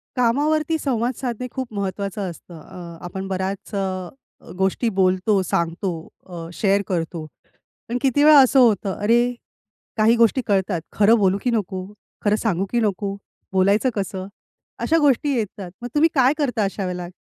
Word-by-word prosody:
कामावरती 300 +6 +1
संवाद 250 -4 -1
साधणे 250 -1 -4
खूप 260 -3 -5
महत्वाचं 200 0 -3
असतं. 170 0 -11
अ, 170 +1 -10
आपण 190 +2 -5
बऱ्याच 190 +2 -4
अ, 185 -2 -2 0.5
गोष्टी 190 +5 +1
बोलतो, 190 +2 +2
सांगतो, 170 +2 -1 0.4
अ, 170 -2 -7
शेअर 200 +2 +2
करतो. 165 -2 -3 0.6
पण 240 - -1
किती 275 +1 +2
वेळा 300 -1 +8
असं 265 0 +5
होतं, 210 -5 +3
अरे 240 +4 +2 0.6
काही 220 +2 +4
गोष्टी 235 +3 +3
कळतात 190 -3 +1
खरं 215 +3 +5
बोलू, 195 -1 +3
की 250 - +1
नको? 190 -4 -2 0.4
खरं 205 0 +4
सांगू, 195 -4 0
की 240 - +1
नको? 200 -2 -1 0.4
बोलायचं 200 +6 +3
कसं? 195 -2 -4 0.5
अशा 325 - +2
गोष्टी 290 0 +3
येतात, 200 -4 -4
मग 245 - -4
तुम्ही 315 +2 +5
काय 260 0 +4
करता 250 -7 0
अशा 195 0 -2
वेळेला? 180 -1 -4
205 Hz, 155 wpm, -22 LUFS, 185-245 Hz, 0.6 s, वेळा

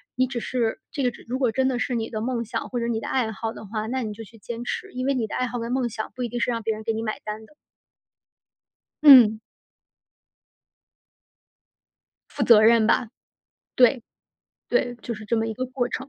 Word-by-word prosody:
“你 255 +1 +2
只 250 -2 -4
是 235 -2 -1
这 280 - -3
个 250 - +3
只 - - -15
如 255 +2 -2
果 255 -3 +2
真 260 +3 +1
的 250 -2 -1
是 250 - -1
你 225 -1 -2
的 220 - -4
梦 235 0 -2
想 225 - -4
或 245 - -2
者 235 - -1
你 230 -2 -1
的 - - -7
爱 240 -4 0
好 225 +1 -4
的 - - -10
话， 215 +1 -4
那 260 +1 -2
你 215 -2 -4
就 225 +2 -9
去 225 +2 -17
坚 235 +2 -7
持。 - - -4
“因 255 0 -3
为 275 - +2
你 240 -4 -1
的 - - -6
爱 255 - 0
好 245 0 -4
跟 230 +1 -4
梦 255 -1 0
想 220 -1 -6
不 250 - -4
一 - - -1
定 240 - -4
是 245 - +1
让 230 -1 -2
别 220 0 0
人 215 0 -8
给 225 - -1
你 220 - -3
买 215 -1 -3
单 215 +1 -6
的。 260 - -22 1.5
嗯。 240 -7 +9 2.9
负 285 - -4
责 230 -2 +7
任 225 0 +5
吧。 230 +1 +2 0.7
对， 250 0 +4 0.7
对， 245 0 +1
就 235 - -4
是 215 0 -10
这 230 +2 0
么 225 0 0
一 225 - -4
个 255 +3 -3
过 250 -1 -2
程。 265 +2 -5
235 Hz, 245 characters per minute, -24 LUFS, 220-250 Hz, 2.9 s, 嗯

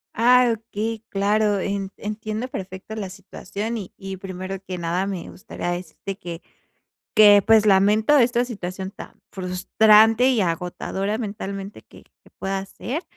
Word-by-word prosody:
Ah, 245 0 +5
okey, 225 0 -5
claro, 205 0 +1
en 195 0 -2
entiendo 215 +3 -4
perfecto 195 -2 -7
la 200 -4 -4
situación, 200 +3 -6
y 195 -4 -8
y 195 -1 -7
primero 185 0 -6
que 185 -1 -4
nada 175 +3 -1
me 185 -4 -5
gustaría 175 -1 -5
decirte 180 +2 -6
que, 170 -1 -7 0.7
que 205 -2 +8
pues 220 -1 +6
lamento 210 +7 +4
esta 245 0 +3
situación 190 -4 -6
tan - - -12
frustrante 215 +5 +4
y 235 -4 +2
agotadora 185 +4 -2
mentalmente 200 -2 -6
que - - -17
que - - -26
pueda 195 0 -2
ser. 290 - -5
200 Hz, 140 wpm, -23 LUFS, 190-220 Hz, 0.7 s, que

